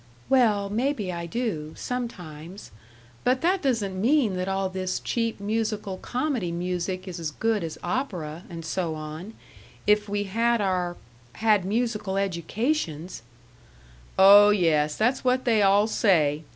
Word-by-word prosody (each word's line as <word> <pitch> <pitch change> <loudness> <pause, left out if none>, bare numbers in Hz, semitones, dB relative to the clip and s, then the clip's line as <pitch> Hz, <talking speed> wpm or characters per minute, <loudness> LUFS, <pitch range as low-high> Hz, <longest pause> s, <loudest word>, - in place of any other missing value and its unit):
"Well, 215 -6 +3
maybe 225 -4 -1
I 170 0 -5
do, 165 -8 -3
sometimes; 185 -8 -6 0.5
but 255 +1 +2
that 370 +3 +2
doesn't 205 -9 -1
mean 240 -4 +3
that 185 +1 -2
all 195 0 0
this 185 0 -3
cheap 230 -2 -2
musical 215 -2 -2
comedy 245 - -2
music 180 +2 -3
is 175 -2 -6
as 165 -2 -3
good 220 +5 -1
as 160 -1 -5
opera, 180 - -3
and 165 -2 -7
so 165 0 -2
on, 155 +7 -8 0.5
if 210 0 +3
we 205 0 -1
had 230 +4 +1
our 180 -3 -1 0.4
had 215 -4 +2
musical 210 -2 -1
educations 185 - -2 0.5
" - - -25
"Oh 200 +2 +9
yes; 155 -7 +2
that's 245 +5 +1
what 255 0 +1
they 225 -4 +3
all 200 +1 +5
say! 160 -9 +2
195 Hz, 140 wpm, -25 LUFS, 170-225 Hz, 0.5 s, Oh